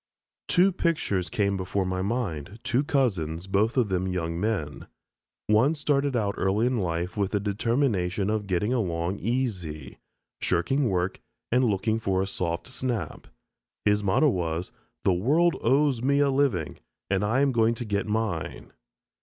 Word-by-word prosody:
Two 185 +2 +4
pictures 155 - 0
came 100 -2 +1
before 95 +1 -1
my 95 0 -2
mind: 100 - -3
two 130 +1 +1
cousins, 95 - 0
both 105 +6 +1
of 120 -5 +3
them 95 0 0
young 85 -2 -2
men. 95 -9 -2 0.6
One 115 +9 +3
started 145 -2 0
out 105 -4 0
early 100 +4 +2
in 125 -1 +1
life 85 +2 -2
with 100 -1 -1
the 105 - +2
determination 100 -2 0
of 105 -1 -1
getting 100 +6 0
along 90 -4 -1
"easy," 95 - -3 0.4
shirking 120 +10 +1
work, 90 0 -1 0.3
and 125 +2 +3
looking 110 +1 +1
for 95 -4 0
a 95 - +1
soft 85 -3 -3
snap. 120 - -4 0.6
His 105 0 +3
motto 100 +10 +3
was, 85 -4 -2 0.3
"The 95 - +3
world 150 - +2
owes 135 -3 +2
me 140 +3 +2
a 140 -1 +3
living, 130 - 0 0.3
and 95 0 +2
I 115 +6 +2
am 140 -1 +3
going 115 -1 +2
to 120 - -5
get 100 -1 -1
mine." 105 -6 -3
105 Hz, 155 wpm, -26 LUFS, 90-125 Hz, 0.6 s, Two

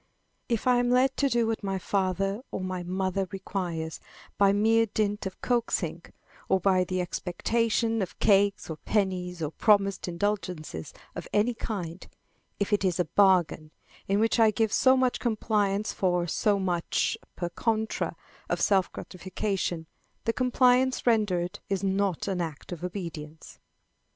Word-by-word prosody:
If 230 -3 0
I 250 -1 +4
am 245 0 +1
led 255 +2 +3
to 280 - +2
do 235 -2 +2
what 225 -1 -2
my 195 -1 -1
father 195 +2 -1
or - - -4
my 185 -1 -3
mother 185 +1 -1
requires, 175 -5 -4 0.4
by 200 -1 +4
mere 225 +3 +3
dint 205 -1 -1
of 190 - -9
coaxing, 240 -2 -1 0.5
or 190 - +4
by 185 0 +3
the 185 0 -2
expectation 225 +6 0
of 185 - -4
cakes 200 -1 +3
or 160 - -5
pennies 180 -3 -1
or 150 - -2
promised 200 -1 +2
indulgence 180 -2 -2 0.4
of - - -7
any 215 +4 +2
kind, 185 -6 -5 0.5
if 200 +1 -1
it 205 - +2
is 180 -3 +1
a 180 - +2
bargain, 175 -4 +3 0.4
in 195 +1 +2
which 225 +2 +2
I 225 -1 +6
give 215 0 0
so 260 0 +5
much 255 -1 +1
compliance 215 -3 0
for 180 -2 +1
so 205 +4 +1
much 180 -3 0 0.2
per 175 -1 -3
contra 220 +4 -1 0.3
of - - 0
self 190 -4 +2
gratification, 185 -2 -3 0.4
the 230 - 0
compliance 255 +1 +3
rendered 200 -7 +1
is 195 -1 -1
not 195 -2 0
an 190 -3 -1
act 160 -2 -6
of 175 -1 -6
obedience. 165 -4 -7
195 Hz, 150 wpm, -28 LUFS, 180-220 Hz, 0.5 s, I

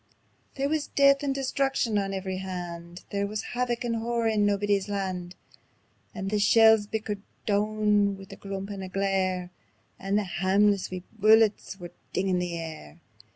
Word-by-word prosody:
There 275 0 0
wis 305 0 -1
death 275 0 +4
and 275 -2 -1
destruction 270 -5 0
on 195 -1 -2
every 190 -1 -3
hand; 175 -2 -6
There 200 0 -1
wis 210 +1 -4
havoc 245 0 -1
and 230 -1 -1
horror 230 0 0
on 210 -1 +2
Naebuddy's 205 -1 +1
Land. 185 -3 -3 0.8
And 195 -1 -4
the 210 - +1
shells 220 0 +6
bickered 210 -2 -3 0.2
doun 210 -1 +2
wi' 195 - -10
a - - -8
crump 195 0 -6
and 200 -1 -6
a 190 - -6
glare, 185 -2 -1 0.5
And 195 +1 0
the 210 - +1
hameless 195 +2 +2
wee 185 -1 -6
bullets 215 -2 +3
were 175 -1 -8 0.2
dingin' 185 -1 +1
the 175 -1 -3
air. 155 - -8
200 Hz, 160 wpm, -27 LUFS, 190-220 Hz, 0.8 s, shells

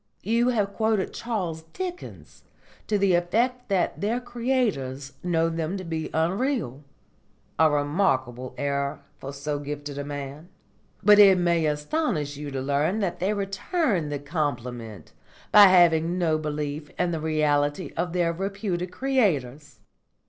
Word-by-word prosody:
You 230 +4 +2
have 205 -5 0
quoted 220 -3 0
Charles 185 -9 -3
Dickens 365 -1 -7 0.5
to 210 - +1
the 195 -2 +3
effect 235 +9 0
that 190 -3 0
their 220 +4 0
creators 230 - -2
know 165 -2 +1
them 165 +3 -2
to 185 - -6
be 160 -2 -4
unreal 165 - -1 0.8
a 160 -1 +6
remarkable 135 -5 0
error 140 0 -2 0.2
for 135 - -6
so 145 +1 -3
gifted 145 0 -6
a - - -3
man. 145 +3 -7 0.5
But 210 +1 +7
it 195 -2 +8
may 170 -3 +2
astonish 150 - -1
you 145 +1 -6
to 135 -1 -4
learn 145 +8 0
that 185 -3 -2
they 190 +3 +1
return 195 - -1
the 145 - -2
compliment 125 - -4 0.4
by 205 -1 +10
having 175 -2 +4
no 160 -3 +1
belief 150 0 -4
in 180 -1 +1
the 165 - -2
reality 150 0 0
of 175 +1 -1
their 170 -1 +1
reputed 190 -1 -3
creators. 150 - -1
165 Hz, 140 wpm, -25 LUFS, 145-200 Hz, 0.8 s, by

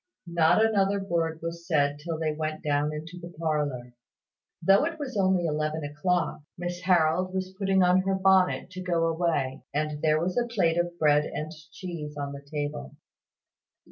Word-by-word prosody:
Not 170 +4 +4
another 200 -2 +2
word 165 -4 -2
was 170 0 -5
said 145 -2 +2
till 165 +1 -4
they 160 -1 0
went 155 0 -4
down 145 0 +1
into 160 +4 -7
the 170 0 -8
parlour. 145 -6 -2 0.7
Though 195 +6 +5
it 330 0 -3
was 280 -5 -5
only 190 -3 +2
eleven 155 0 -1
o'clock, 150 +4 -1 0.2
Miss 175 0 -4
Harold 180 +1 +2
was 190 0 -3
putting 195 -1 +3
on 180 +1 +4
her 190 0 0
bonnet 190 -1 +3
to 185 0 -7
go 170 -2 +1
away: 160 -5 0
and 150 0 -1
there 155 -1 +3
was 180 +7 0
a 240 - -1
plate 175 -8 +1
of 175 0 -2
bread 150 -2 +4
and 155 +1 -5 0.2
cheese 155 -5 -7
on 140 -1 -3
the 140 - -8
table. 140 - -5
165 Hz, 175 wpm, -27 LUFS, 150-185 Hz, 0.7 s, Though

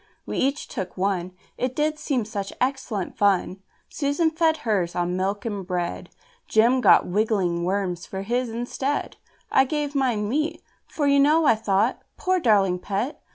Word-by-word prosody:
We - - -3
each 275 +3 0
took 190 -5 -6
one, 185 -1 -1 0.3
It 255 0 -1
did 305 0 0
seem 255 -8 -1
such 200 -2 -4
excellent 255 -7 -2
fun! 195 -1 +2 0.3
Susan 295 +3 0
fed 320 0 +2
hers 190 -6 0
on 175 0 -1
milk 195 +3 -2
and 205 -4 -3
bread, 175 - -3 0.4
Jem 235 +4 +4
got - - +6
wriggling 185 -4 0
worms 185 -2 -2
for 190 0 -5
his 240 +3 -1
instead. 245 +5 -3 0.3
I 265 - +5
gave 295 +1 -2
mine 245 -7 0
meat, 310 +7 -1 0.2
For, 295 - -2
you 280 0 +4
know, 305 +3 +4
I - - +6
thought, 215 +1 0 0.2
"Poor 370 0 +1
darling 200 - +3
pet! 205 - -3
225 Hz, 160 wpm, -24 LUFS, 195-280 Hz, 0.4 s, got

